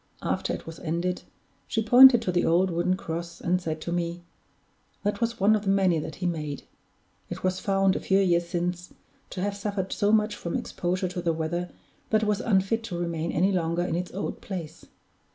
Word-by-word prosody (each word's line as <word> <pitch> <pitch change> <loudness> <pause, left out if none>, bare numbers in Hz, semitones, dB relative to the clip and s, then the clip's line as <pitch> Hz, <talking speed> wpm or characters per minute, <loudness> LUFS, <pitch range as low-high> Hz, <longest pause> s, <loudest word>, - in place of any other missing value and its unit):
After - - -1
it - - -5
was 165 0 -9
ended, 175 +2 -2 0.5
she 225 - 0
pointed 245 +1 +8
to 185 - 0
the 175 0 +1
old 180 +3 +3
wooden 175 +2 +1
cross, 170 -1 -5
and 180 +1 0
said 160 -2 -3
to 170 - -4
me: 175 0 -2 0.8
"That 205 +1 -1
was 230 0 -1
one 205 +3 +5
of 210 - -1
the 200 - -2
many 190 -4 +3
that 155 +1 -6
he 185 - -5
made. 155 -5 -3 0.7
It - - -6
was 185 0 0
found, 195 -1 +2
a - - -1
few 190 - +2
years 175 -3 +2
since, 180 0 -3 0.3
to 180 - -5
have 200 +1 -1
suffered 200 -2 -3
so 205 -1 +1
much 215 -1 +2
from 170 - -4
exposure 185 +1 -2
to 180 0 -4
the 170 -1 +1
weather 170 +2 -2 0.4
that 220 0 +2
it - - +1
was 210 +1 0
unfit 215 +1 +1
to 180 -6 -5
remain 170 -1 -2
any 185 +5 +2
longer 170 -1 0
in 175 - -2
its 180 +1 -3
old 195 - -4
place. 165 -4 -7
180 Hz, 205 wpm, -26 LUFS, 170-200 Hz, 0.8 s, pointed